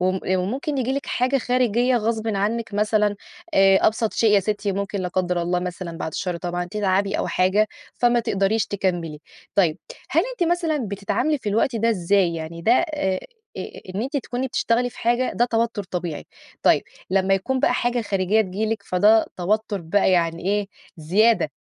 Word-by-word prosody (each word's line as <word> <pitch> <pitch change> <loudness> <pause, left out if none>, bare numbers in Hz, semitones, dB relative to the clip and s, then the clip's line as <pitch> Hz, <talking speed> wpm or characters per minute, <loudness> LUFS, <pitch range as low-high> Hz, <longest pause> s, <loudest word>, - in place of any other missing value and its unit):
وم 185 +1 0
وممكن 255 - -1
ييجي 260 +1 0
لِك 280 0 -3
حاجة 255 +2 +1
خارجية 245 0 +2
غصبٍ 225 0 -1
عنِّك 215 +2 -1
مثلًا، 210 0 +1 0.4
آآ، 195 0 +6
أبسط 220 0 +1
شيء 225 -2 +2
يا 200 - +5
ستي 205 0 -2
ممكن- 200 +1 -3
لا 180 - -2
قدّر 180 -1 -1
الله 175 +1 0
مثلًا 175 -2 -5
بعد 160 - -4
الشر 180 -2 -2
طبعًا- 175 +1 -3
تتعبي 200 -1 0
أو - - -1
حاجة 195 +4 +2 0.3
فما 240 0 +3
تقدريش 215 -1 0
تكمّلي. 175 -6 -2 0.3
طيب، 170 -6 +2 0.3
هل 330 +4 +3
أنتِ 350 -8 0
مثلًا 335 -3 +1
بتتعاملي 205 +10 -1
في 230 - -4
الوقت 230 +4 +1
ده 230 +1 +2
إزاي، 185 -2 +2
يعني 165 +1 -6
ده 230 - +4
آآ، 260 - 0 0.4
إ - - -2 0.3
إن 205 - -1
أنتِ 270 +4 -3
تكوني 260 -1 -3
بتشتغلي 245 -1 0
في - - -16
حاجة 240 +2 +1
ده 240 - +3
توتّر 230 -3 -1
طبيعي، 175 -4 -4 0.4
طيب - - +4 0.3
لمّا 195 0 +3
يكون 260 +8 -1
بقى 250 - +3
حاجة 240 0 0
خارجية 195 +1 +1
تيجي 205 +1 -2
لِك، 220 0 -2
فده 210 +5 +4
توتّر 205 +2 -1
بقى 180 +4 +2
يعني 170 -2 +1
إيه 205 +1 +1 0.3
زيادة، 185 +2 +2
205 Hz, 175 wpm, -23 LUFS, 185-235 Hz, 0.4 s, آآ